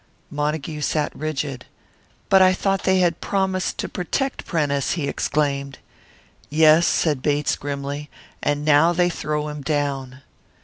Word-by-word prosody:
Montague 150 Hz, +1 st, -2 dB
sat 150 Hz, 0 st, -1 dB
rigid. 145 Hz, -4 st, -4 dB, 0.6 s
"But 190 Hz, -1 st, +6 dB
I 185 Hz, 0 st, +6 dB
thought 195 Hz, +1 st, -1 dB
they 190 Hz, 0 st, +4 dB
had 170 Hz, -2 st, +1 dB
promised 190 Hz, -1 st, -1 dB
to -, -, -3 dB
protect 265 Hz, +10 st, -3 dB
Prentice!" 145 Hz, -5 st, 0 dB
he 155 Hz, -5 st, -2 dB
exclaimed. 140 Hz, -2 st, -1 dB, 0.7 s
"Yes," 155 Hz, +2 st, +5 dB
said 150 Hz, -5 st, +1 dB
Bates, 145 Hz, +1 st, +1 dB
grimly; 145 Hz, +1 st, -5 dB, 0.3 s
"and 145 Hz, 0 st, -1 dB
now 155 Hz, +3 st, +5 dB
they 175 Hz, +1 st, +2 dB
throw 150 Hz, -2 st, -2 dB
him 150 Hz, -1 st, -6 dB
down." 140 Hz, -3 st, -2 dB
150 Hz, 135 wpm, -22 LUFS, 145-170 Hz, 0.7 s, But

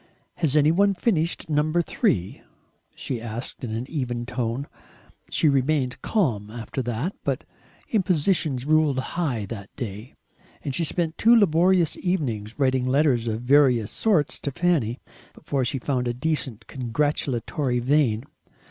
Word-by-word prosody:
"Has 155 Hz, -4 st, +1 dB
any 150 Hz, 0 st, +5 dB
one 200 Hz, +3 st, +3 dB
finished 175 Hz, -4 st, 0 dB
number 155 Hz, +3 st, +1 dB
three?" 100 Hz, -, -1 dB, 0.5 s
she 125 Hz, -4 st, -4 dB
asked 115 Hz, +3 st, -6 dB
in 120 Hz, -, -3 dB
an 115 Hz, +3 st, -3 dB
even 125 Hz, -6 st, -3 dB
tone. 125 Hz, +1 st, -2 dB, 0.6 s
She 160 Hz, -, +2 dB
remained 135 Hz, -2 st, +1 dB
calm 120 Hz, -, 0 dB
after 115 Hz, +3 st, -5 dB
that. 125 Hz, -, -3 dB
But -, -, -1 dB, 0.5 s
impositions 170 Hz, -, +1 dB
ruled 155 Hz, -2 st, +3 dB
high 130 Hz, -5 st, -2 dB
that 100 Hz, -1 st, -8 dB
day. 110 Hz, +1 st, -7 dB, 0.5 s
And 140 Hz, -, -3 dB
she 170 Hz, -, +1 dB
spent 165 Hz, +1 st, -1 dB
two 230 Hz, +2 st, +6 dB
laborious 180 Hz, -4 st, +4 dB
evenings 120 Hz, -, -2 dB
writing 130 Hz, -2 st, +2 dB
letters 130 Hz, -3 st, +2 dB
of 110 Hz, 0 st, -2 dB
various 125 Hz, -5 st, +4 dB
sorts 185 Hz, -10 st, +1 dB
to 140 Hz, -, -3 dB
Fanny, 140 Hz, -7 st, 0 dB, 0.4 s
before 140 Hz, -3 st, -2 dB
she 130 Hz, +3 st, -1 dB
found 125 Hz, -1 st, -1 dB
a 120 Hz, -, -1 dB
decent 130 Hz, -6 st, -2 dB
congratulatory 130 Hz, 0 st, -1 dB
vein. 125 Hz, -3 st, +2 dB
135 Hz, 140 wpm, -24 LUFS, 120-160 Hz, 0.6 s, two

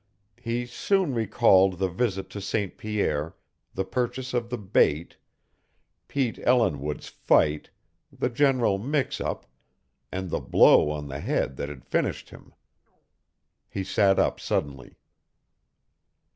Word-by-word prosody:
He 120 Hz, +1 st, -2 dB
soon 180 Hz, +6 st, 0 dB
recalled 100 Hz, -4 st, +3 dB
the 95 Hz, +1 st, 0 dB
visit 95 Hz, 0 st, -2 dB
to 100 Hz, -, -6 dB
St. 100 Hz, 0 st, -2 dB
Pierre, 85 Hz, -8 st, -2 dB, 0.4 s
the 95 Hz, -, -1 dB
purchase 125 Hz, +3 st, -3 dB
of 120 Hz, -1 st, -1 dB
the 125 Hz, -, -3 dB
bait, 85 Hz, -6 st, +1 dB, 0.9 s
Pete 130 Hz, -5 st, -1 dB
Ellinwood's 75 Hz, -, +1 dB
fight, 75 Hz, 0 st, +1 dB, 0.4 s
the -, -, -2 dB
general 125 Hz, -6 st, +2 dB
mix 140 Hz, +5 st, -1 dB
up, -, -, -3 dB, 0.7 s
and 95 Hz, -2 st, -4 dB
the -, -, 0 dB
blow -, -, +5 dB
on 75 Hz, -1 st, -4 dB
the 70 Hz, 0 st, -6 dB
head 70 Hz, -, -1 dB
that 70 Hz, -, -4 dB
had 70 Hz, -3 st, -10 dB
finished -, -, -2 dB
him. -, -, -15 dB, 1.1 s
He 95 Hz, -, -4 dB
sat 95 Hz, 0 st, +2 dB
up -, -, +1 dB
suddenly. 70 Hz, -2 st, -3 dB
100 Hz, 125 wpm, -26 LUFS, 80-120 Hz, 1.1 s, blow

